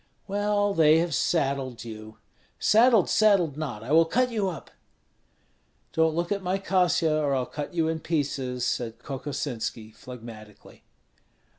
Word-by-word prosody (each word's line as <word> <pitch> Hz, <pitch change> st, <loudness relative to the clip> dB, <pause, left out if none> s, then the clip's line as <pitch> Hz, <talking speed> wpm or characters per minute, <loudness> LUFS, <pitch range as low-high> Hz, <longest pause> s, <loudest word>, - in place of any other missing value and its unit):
"Well, 205 Hz, 0 st, 0 dB
they 160 Hz, -3 st, +5 dB
have 170 Hz, 0 st, 0 dB
saddled 135 Hz, -6 st, -1 dB
you!" 110 Hz, -1 st, -10 dB, 0.4 s
"Saddled, 225 Hz, -2 st, +4 dB
saddled 195 Hz, -9 st, +3 dB
not, 135 Hz, -9 st, -5 dB
I 125 Hz, -, -6 dB
will 165 Hz, +1 st, +6 dB
cut 250 Hz, +9 st, +1 dB
you 210 Hz, -4 st, 0 dB
up!" 170 Hz, -, -9 dB, 1.2 s
"Don't 160 Hz, -1 st, +2 dB
look 170 Hz, +2 st, -2 dB
at 200 Hz, -1 st, 0 dB
my 185 Hz, +1 st, -1 dB
Kasia 180 Hz, -5 st, +1 dB
or 140 Hz, -2 st, +1 dB
I'll 130 Hz, -1 st, 0 dB
cut 150 Hz, +6 st, -7 dB
you 165 Hz, -2 st, +1 dB
to 160 Hz, 0 st, -2 dB
pieces," 135 Hz, -6 st, -2 dB
said 115 Hz, -2 st, -2 dB
Kokosinski, 125 Hz, -4 st, -5 dB
phlegmatically. 110 Hz, -2 st, -12 dB
155 Hz, 140 wpm, -26 LUFS, 125-185 Hz, 1.2 s, will